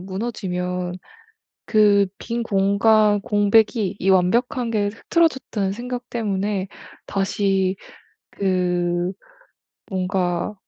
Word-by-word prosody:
무너지면 180 -3 -4 0.7
그 205 -2 +4
빈 235 0 -3
공간 205 +1 +3
공백이 205 0 +2
이 195 - 0
완벽한 230 +7 +2
게 210 -2 +1
흐트러졌다는 235 - 0
생각 245 +2 -6
때문에 200 -3 -2 0.4
다시 195 -1 0 0.5
그 180 -2 0 0.8
뭔가 185 -1 -1
200 Hz, 180 characters per minute, -22 LUFS, 185-220 Hz, 0.8 s, 그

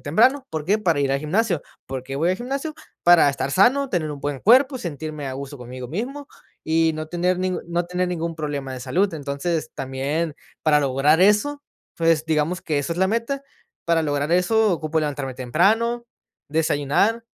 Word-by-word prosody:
temprano, 255 - +3
¿por 155 -2 -3
qué?, 205 +5 +2
para 170 -8 +1
ir 135 -1 +1
al 140 - +1
gimnasio, 180 +2 0 0.3
¿por 130 -1 -5
qué 135 +1 -6
voy 165 +5 +2
al 185 - 0
gimnasio?, 275 +5 -4 0.3
para 175 -4 +6
estar 135 0 -3
sano, 255 - +4
tener 160 -4 -1
un 145 -2 -7
buen 145 -1 -3
cuerpo, 260 +4 +5
sentirme 155 - -5
a 135 - -4
gusto 140 0 -7
conmigo 125 +1 -8
mismo 260 - -4 0.4
y 160 0 +2
no 155 0 -5
tener 180 +1 0
ningún 185 0 -1
no 170 0 0
tener 180 0 -1
ningún 170 -1 -3
problema 145 -4 -4
de 130 - -6
salud, 190 +8 0
entonces, 150 +3 -3
también 140 +4 -2 0.3
para 150 -2 +4
lograr 140 +4 +3
eso, 210 +9 +3 0.4
pues, 165 -2 +3
digamos 160 +3 0
que 150 -2 -1
esa 145 +4 -2
es - - -7
la 190 0 +3
meta, 235 +5 -1 0.4
para 170 -1 +2
lograr 145 +1 -1
eso 210 +4 +3
ocupo 160 -1 -1
levantarme 140 -3 -3
temprano, 220 - +1 0.4
desayunar, 160 +9 +1
165 Hz, 185 wpm, -23 LUFS, 145-200 Hz, 0.4 s, para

